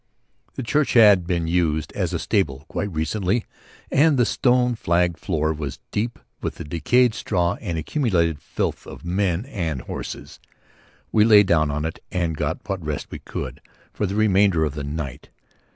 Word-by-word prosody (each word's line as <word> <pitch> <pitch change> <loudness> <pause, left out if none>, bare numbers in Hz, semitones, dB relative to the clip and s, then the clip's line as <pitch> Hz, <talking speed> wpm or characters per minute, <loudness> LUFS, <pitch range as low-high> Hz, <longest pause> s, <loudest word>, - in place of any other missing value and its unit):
The 130 - -4
church 145 +5 +1
had 105 -7 +6
been 85 -3 0
used 80 -3 0
as - - -1
a - - -1
stable 75 -8 -1
quite 100 - -3
recently 95 +7 -1 0.5
and 145 0 +4
the 120 - +4
stone 125 0 +2
flagged 85 -5 +1
floor 80 -4 0
was 75 -4 -5
deep 115 +3 -2 0.2
with - - -3
the - - -7
decayed 110 - +2
straw 90 -5 0
and 90 -7 -3
accumulated 85 - 0
filth - - -3
of - - -10
men 90 +2 0
and 85 - -3
horses. - - -7 0.7
We 105 - +5
lay 105 -2 +7
down 80 -5 +2
in 75 +2 -2
it 80 - -4
and 85 -3 -1
got - - -3
what 95 -3 -3
rest 75 -1 -4
we - - -6
could - - -6 0.3
for 105 - -1
the 95 - -3
remainder 100 -5 +3
of 75 - -3
the 75 -1 -5
night. 70 -2 -5
90 Hz, 170 wpm, -23 LUFS, 80-105 Hz, 0.7 s, lay